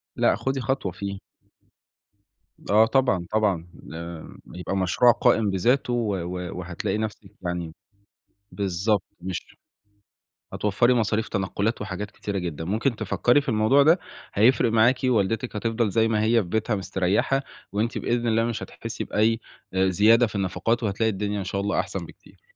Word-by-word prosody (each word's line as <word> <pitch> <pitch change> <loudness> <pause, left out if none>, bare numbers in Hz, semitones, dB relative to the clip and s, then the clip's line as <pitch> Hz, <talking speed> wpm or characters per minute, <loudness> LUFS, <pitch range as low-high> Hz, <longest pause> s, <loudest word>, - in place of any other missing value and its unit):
لأ، - - +3
خُدي 135 0 -2
خطوة 130 -8 -1
فيه. 100 +1 -5 1.5
آه 110 +2 +6
طبعًا 125 -8 +1
طبعًا 100 -6 +1 0.3
آآ 85 -1 -8 0.2
يبقى 90 +2 -3
مشروع 95 +6 +4
قائم 110 -2 +2
بذاته 120 +7 +1
و 110 -5 0
و 90 0 -5
وهتلاقي 90 +3 -3
نفسِك 105 -2 -5
يعني 85 -2 -3 0.8
بالضبط 100 +1 0 0.2
مش 95 -1 -6 1.0
هتوَفّري 110 +5 +2
مصاريف 110 -1 0
تنقلات 100 +3 -1
وحاجات 100 +1 -5
كتيرة 100 -1 -4
جدًا، 80 -3 -4
ممكن 110 +6 0
تفَكّري 125 +4 +2
في 140 - -10
الموضوع 110 +5 +4
ده 165 +5 +5 0.4
هيفرق 115 +2 +4
معاكِ 120 +3 +4
ووالدتِك 115 0 0
هتفضل 115 0 0
زي 115 +2 +2
ما 105 -1 +1
هي 115 0 +3
في 85 - -9
بيتها 110 +2 0
مسترَيّحة، 95 +8 0 0.3
وأنتِ 110 +3 -1
بإذن 120 0 -1
الله 115 0 +2
مش 115 -2 -3
هتحِسّي 115 -1 -6
بأي 115 +2 +1 0.3
أ 95 0 +3
زيادة 110 +6 +5
في 110 - -10
النفقات 105 +5 0
وهتلاقي 110 +2 +1
الدنيا 105 +1 -2
إن 95 - -3
شاء 100 +1 -2
الله 100 +1 0
أحسن - - -5
بكتير. - - -18
105 Hz, 150 wpm, -25 LUFS, 95-115 Hz, 1.5 s, آه